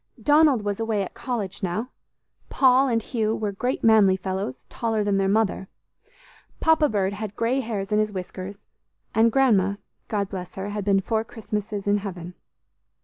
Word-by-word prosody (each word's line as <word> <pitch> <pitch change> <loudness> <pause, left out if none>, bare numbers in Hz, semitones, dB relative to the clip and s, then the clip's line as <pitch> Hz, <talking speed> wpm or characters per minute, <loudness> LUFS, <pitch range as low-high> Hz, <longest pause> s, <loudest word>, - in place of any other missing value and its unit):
Donald 295 -6 +4
was 205 0 -2
away 220 -3 0
at 185 - -8
college 225 -7 -4
now. 210 +7 -2 0.6
Paul 265 0 +4
and 230 -3 0
Hugh 220 -2 -1
were 210 -2 -2
great 245 +6 -2
manly 210 -4 +5
fellows, 185 -9 -4
taller 225 -2 -1
than 205 -1 +1
their 195 0 +2
mother. 205 -2 +1 0.9
Papa 320 -2 +4
Bird 200 -3 0
had 210 0 -6
grey 240 +4 +1
hairs 215 -5 -4
in 210 - +3
his 215 0 +1
whiskers; 190 +1 -7 0.5
and 225 +1 +4
Grandma, 210 -7 +3 0.3
God 200 -2 -1
bless 180 -2 -7
her, 195 +1 -4
had 205 0 -3
been 195 -1 +3
four 220 +2 -1
Christmases 210 -2 -5
in 205 0 +3
heaven. 180 -3 -7
210 Hz, 165 wpm, -24 LUFS, 195-230 Hz, 0.9 s, manly